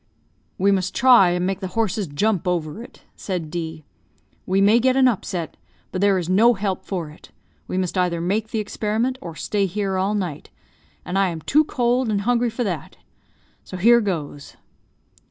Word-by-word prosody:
"We 200 +2 +3
must 185 -2 -1
try 240 -7 +6
and 175 0 0
make 195 0 -2
the 190 - -4
horses 215 -3 0
jump 180 +6 0
over 175 +2 -2
it," 240 - -14
said 175 -6 -4
D. 160 -3 -5 0.6
"We 190 +1 +2
may 205 +4 +5
get 260 +1 +2
an 265 -1 +5
upset, 185 -7 -3 0.3
but 185 - -3
there 200 -1 +4
is 175 -3 -3
no 225 +6 +4
help 195 -2 -3
for 170 -6 -4
it; 150 - -16 0.4
we 185 - -3
must 185 -1 -1
either 180 -2 0
make 200 +6 -1
the 225 - -4
experiment, 220 +4 -2
or 165 -2 -8
stay 200 +4 -1
here 195 0 -2
all 195 +3 0
night, 180 -8 -4 0.6
and 190 +2 -1
I 195 - +3
am 165 -2 -5
too 305 - +3
cold 250 -3 0
and 205 -2 0
hungry 240 +2 +1
for 235 +2 -3
that 175 -9 -4 0.7
so 185 - -8
here 235 +5 +5
goes." 155 -8 -4
195 Hz, 185 wpm, -22 LUFS, 180-220 Hz, 0.7 s, try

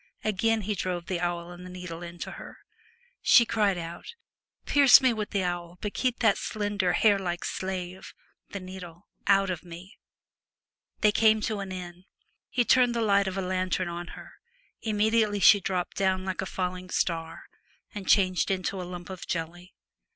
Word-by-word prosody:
Again 220 +2 +1
he 210 +1 -2
drove 180 -3 -3
the 180 -1 -2
awl 175 0 -3
and 175 0 -10
needle 180 -2 -7
into 175 0 -7
her. - - -10 0.6
She 245 -4 +6
cried 210 -4 +1
out, 170 - -7 0.2
' - - -54
Pierce 280 -3 +7
me 260 -2 +3
with 215 -2 -4
the 200 -2 -1
awl, 175 -1 -4
but 210 - -4
keep 255 -2 0
that 220 -4 +3
slender, 205 -4 -1
hair 205 +1 +4
like 175 -2 -3
slave 185 -1 -5 0.3
(the 200 - -6
needle) 185 -1 -10 0.2
out 195 -1 +4
of 175 - -4
me.' 175 +2 -12 1.0
They 210 - +5
came 220 0 +4
to 215 -1 -2
an 195 -1 -5
inn. 180 0 -8 0.4
He 245 -2 +1
turned 245 -1 +4
the 235 - 0
light 200 -2 +3
of 190 0 -3
a 195 - -1
lantern 185 -1 -1
on 170 0 -6
her; - - -11 0.5
immediately 215 -1 +1
she 205 +1 +7
dropped 180 -1 -3
down 190 -1 +1
like 190 0 -3
a 190 - -4
falling 185 0 -4
star, 165 -2 -2 0.5
and 200 -2 -7
changed 185 -3 +3
into 190 0 -2
a 180 - -7
lump 180 +1 -8
of 185 - -8
jelly. 175 +2 -5
185 Hz, 175 wpm, -27 LUFS, 175-205 Hz, 1.0 s, Pierce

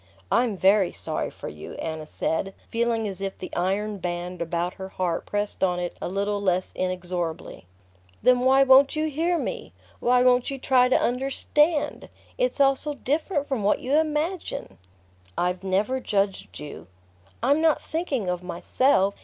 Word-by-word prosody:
"I'm 235 -5 +2
very 190 0 +4
sorry - - -3
for - - -9
you," 75 0 -8
Anna 160 -1 -5
said, 195 +6 -2
feeling 230 -1 0
as 195 -1 -5
if 195 -1 -4
the 185 - -7
iron 200 +3 -1
band 175 0 -4
about 170 +1 -1
her 190 -1 -8
heart 180 -3 -2
pressed 205 -1 -2
on 180 -1 +2
it 175 -1 -4
a - - -3
little 200 +2 -1
less 185 -2 0
inexorably. 180 - -3 0.6
"Then 250 0 +5
why 265 +2 +5
won't 270 +2 +6
you 310 0 0
hear 325 +4 0
me? - - -4 0.3
Why 250 +1 +3
won't 250 -1 +4
you 275 - -4
try 255 -1 +3
to - - +4
understand? 280 +5 0 0.3
It's - - 0
all 275 -1 +5
so 295 +2 -4
different 290 +3 -1
from 270 -6 -2
what 205 +1 +3
you 260 - -3
imagine!" 315 - -2 0.6
"I've 180 +1 -1
never 200 +7 0
judged 200 -5 -1
you." 140 - -9 0.6
"I'm 285 +5 +3
not 320 -2 +4
thinking 295 - -2
of 180 -1 -1
myself. 190 +4 +1
210 Hz, 160 wpm, -25 LUFS, 180-270 Hz, 0.6 s, won't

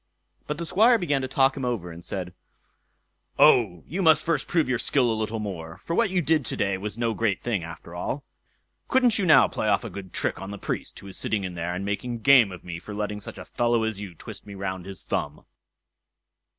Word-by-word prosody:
But 150 - -3
the 170 - -4
Squire 225 +8 +5
began 145 -9 0
to 130 - -2
talk 135 +1 +3
him 135 - -5
over, 115 -9 -2
and 85 +1 -11
said, 90 0 -5 1.0
"Oh, 95 -9 +5
you 180 +8 -3
must 160 -3 +5
first 165 -2 0
prove 165 -5 +2
your 125 -2 0
skill 125 -4 +3
a - - +1
little 110 +1 -2
more; 90 -6 -6
for 165 - -2
what 230 0 +3
you 180 -2 0
did 155 -1 +2
to - - -3
day 100 -1 +1
was 105 +2 -5
no 115 -1 0
great 110 -3 0
thing, 110 -8 -2
after 85 +1 -9
all. 130 +11 -3 0.6
Couldn't 250 -4 +3
you 190 - +1
now 155 -5 +7
play - - -3
off - - +2
a - - -6
good 95 -2 -8
trick - - -2
on 95 - -6
the 100 - -6
Priest, - - -4
who 100 - -11
is 95 - -4
sitting 105 -3 0
in 90 -1 -4
there, 85 +1 -3
and 95 +2 -4
making 115 +3 -3
game 125 -5 +6
of 90 - -10
me 85 -1 -6
for 105 +3 -8
letting 105 0 -3
such - - -8
a - - -8
fellow 120 -1 +1
as 110 -3 -2
you 100 -4 -8
twist 80 - -10
me 100 - -8
round 95 -1 -4
his 95 -5 -9
thumb." - - -3
110 Hz, 235 wpm, -26 LUFS, 95-140 Hz, 1.0 s, now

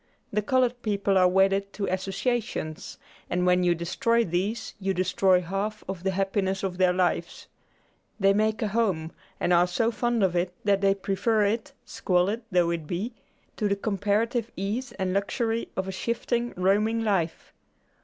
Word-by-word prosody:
The 210 - +2
colored 250 +2 +1
people 200 -3 0
are 185 -1 +6
wedded 195 +2 +2
to 205 - -2
associations, 190 -3 -3 0.3
and 180 +1 0
when 180 0 +3
you 175 -1 +3
destroy 230 +8 +1
these 185 +7 -2
you 195 -1 -1
destroy 185 0 +3
half 195 +4 -3
of 190 -2 -5
the 190 - +1
happiness 195 0 -1
of 185 -1 -3
their 185 -1 +5
lives. 180 -2 -1 0.7
They 195 0 +4
make 215 +3 +1
a 215 - 0
home, 195 -8 0 0.3
and 180 - +2
are 175 +1 +5
so 225 +6 +1
fond 240 -1 0
of 180 -2 +2
it 175 +1 -1
that 200 -1 +2
they 195 0 +3
prefer 205 +2 +1
it, 215 +2 -1
squalid 190 +5 0
though 175 -2 +3
it 165 -3 -4
be, 195 +9 -3 0.4
to 210 - +1
the 200 - +1
comparative 210 +3 0
ease 210 +7 -3
and 185 -1 -2
luxury 225 +3 -1
of 190 0 -1
a - - -3
shifting, 235 +4 -2
roaming 210 +5 +2
life. 185 -7 -1
195 Hz, 165 wpm, -26 LUFS, 185-220 Hz, 0.7 s, are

